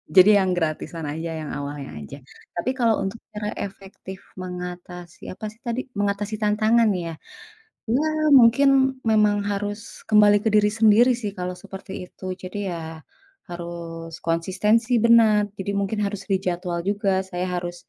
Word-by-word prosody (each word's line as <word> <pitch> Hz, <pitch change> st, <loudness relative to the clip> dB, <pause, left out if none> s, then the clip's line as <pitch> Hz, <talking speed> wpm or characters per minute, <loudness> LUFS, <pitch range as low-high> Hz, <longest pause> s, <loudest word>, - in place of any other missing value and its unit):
jadi 185 Hz, +2 st, +8 dB
yang 185 Hz, -, 0 dB
gratisan 160 Hz, 0 st, -3 dB
aja 160 Hz, +2 st, -4 dB
yang 150 Hz, -, -6 dB
awalnya 145 Hz, 0 st, -6 dB
aja. 75 Hz, -, -9 dB, 0.4 s
Tapi 175 Hz, +8 st, -2 dB
kalau 230 Hz, -3 st, +3 dB
untuk 195 Hz, +4 st, -4 dB, 0.2 s
cara 210 Hz, 0 st, -3 dB, 0.2 s
efektif 190 Hz, -1 st, -10 dB, 0.2 s
mengatasi 180 Hz, -1 st, -8 dB
apa 215 Hz, -, -8 dB
sih 220 Hz, -, -22 dB
tadi, 235 Hz, +2 st, -1 dB, 0.2 s
mengatasi 205 Hz, +1 st, -1 dB
tantangan 215 Hz, +2 st, +3 dB
ya, 165 Hz, -, -4 dB, 0.8 s
ya, 270 Hz, +6 st, +2 dB, 0.4 s
mungkin 240 Hz, +4 st, +5 dB, 0.4 s
memang 210 Hz, -1 st, +4 dB
harus 205 Hz, +1 st, -2 dB, 0.3 s
kembali 210 Hz, -1 st, +6 dB
ke -, -, 0 dB
diri 210 Hz, 0 st, +5 dB
sendiri 225 Hz, +3 st, +6 dB
sih 205 Hz, -2 st, -3 dB
kalau 180 Hz, 0 st, -4 dB
seperti 195 Hz, 0 st, -10 dB, 0.2 s
itu, -, -, -21 dB, 0.2 s
jadi 185 Hz, +3 st, -6 dB
ya 170 Hz, -, -4 dB, 0.7 s
harus 170 Hz, -1 st, -7 dB
konsistensi 195 Hz, +8 st, +1 dB
benar, 225 Hz, -3 st, +6 dB, 0.2 s
jadi 200 Hz, +1 st, -2 dB
mungkin 200 Hz, +2 st, -2 dB
harus 200 Hz, -1 st, -4 dB
dijadwal 180 Hz, -2 st, -1 dB
juga, 205 Hz, 0 st, 0 dB, 0.2 s
saya 180 Hz, 0 st, -3 dB
harus, 175 Hz, 0 st, -4 dB
195 Hz, 145 wpm, -23 LUFS, 175-215 Hz, 0.8 s, jadi